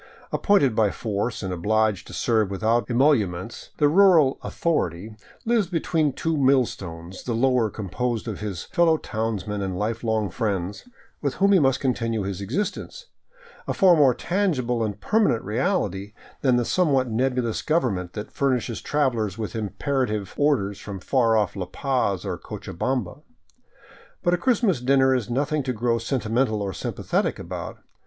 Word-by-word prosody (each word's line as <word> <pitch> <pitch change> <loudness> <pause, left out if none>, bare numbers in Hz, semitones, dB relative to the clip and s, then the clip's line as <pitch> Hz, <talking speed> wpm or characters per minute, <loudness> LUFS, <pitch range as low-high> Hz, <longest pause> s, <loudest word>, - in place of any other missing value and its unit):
Appointed 145 - +3
by 110 -2 +3
force 105 +2 -3
and 95 -1 -3
obliged 105 +2 0
to - - -10
serve 110 -4 +1
without 110 +5 0
emoluments, 120 - +1
the 150 - +4
rural 165 -4 +5
" - - -37
authority 105 - -2
" - - -26
lives 225 -4 +2
between 165 -3 0
two 160 +5 -2
millstones, 95 - 0
the 120 - -3
lower 125 -2 +2
composed 115 +4 -3
of 105 -4 -4
his 100 -4 -4
fellow 165 -2 +2
townsmen 110 - -3
and 95 -2 -3
lifelong 110 0 -1
friends, 100 - -3 0.3
with 140 -3 -1
whom 200 +1 +3
he 195 - +6
must 135 -4 +2
continue 115 -5 -1
his 100 0 -4
existence, 205 - -4 0.6
a - - -1
far 185 -3 +6
more 140 -6 +4
tangible 135 - 0
and 105 -2 -3
permanent 210 - +2
reality 105 - -1 0.3
than 130 -3 +3
the 120 -1 +1
somewhat 140 -7 +2
nebulous 125 0 0
government 100 - 0
that 105 -1 -6
furnishes 125 -4 -1
travelers 120 -9 0
with 110 0 -5
imperative 110 -1 -2
orders 125 -10 +1
from 100 -2 -7
far 115 +2 +2
off 105 -3 0
La 95 -3 -4
Paz 125 -4 -1
or - - -3
Co - - -7
chabamba. 130 - -3 1.0
But 175 - +2
a - - +3
Christmas 220 - +2
dinner 130 +1 +4
is 125 -4 -1
nothing 145 +5 0
to 130 -1 -2
grow 115 +1 0
sentimental 115 -1 0
or 100 - -2
sympa - - -6
thetic - - 0
about. - - -6
120 Hz, 160 wpm, -24 LUFS, 105-140 Hz, 1.0 s, he